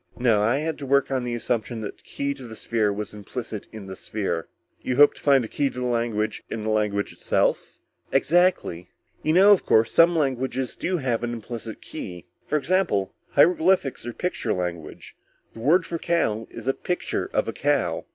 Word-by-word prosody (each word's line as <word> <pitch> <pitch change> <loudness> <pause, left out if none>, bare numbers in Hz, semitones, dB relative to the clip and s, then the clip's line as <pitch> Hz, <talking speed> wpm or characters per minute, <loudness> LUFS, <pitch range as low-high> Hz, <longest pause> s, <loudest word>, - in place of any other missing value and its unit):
No, 115 -4 +3
I 115 +5 +2
had 155 +2 -2
to 140 - -5
work 140 +1 +3
on 130 -2 0
the 120 -1 -2
assumption 115 -1 -2
that 105 - -6
the - - -23
key 140 0 -3
to 130 -3 -10
the 110 - -9
sphere 110 -2 0
was 105 +1 -5
implicit 105 +1 -6
in 110 -3 -9
the 95 0 -7
sphere." 95 -5 -3 0.3
"You 125 - -1
hoped 145 +2 +6
to - - -14
find 140 -3 +4
the - - -4
key 140 +5 0
to 125 - -8
the 125 - -2
language 115 -3 -1
in 110 - -4
the 110 - -1
language 105 -1 0
itself?" - - 0 0.3
"Exactly. 170 - +2 0.3
You 155 - +1
know, 195 +4 +7
of 200 - +5
course, 110 0 +3
some 170 +1 +5
languages 130 -3 -1
do 185 0 -1
have 125 -6 -1
an 120 0 -2
implicit 115 -1 -7
key? 90 - -8 0.2
For 150 - +1
example 140 - +1 0.2
hieroglyphics 165 -1 +3
or 120 - -4
picture 180 +8 -2
language. 85 -4 -5 0.4
The - - -11
word 165 +9 +3
for 170 - -4
cow 115 -12 0
is - - -9
a 135 - +2
picture 180 +5 -3
of - - 0
a - - -2
cow." - - 0
120 Hz, 200 wpm, -24 LUFS, 110-145 Hz, 0.4 s, know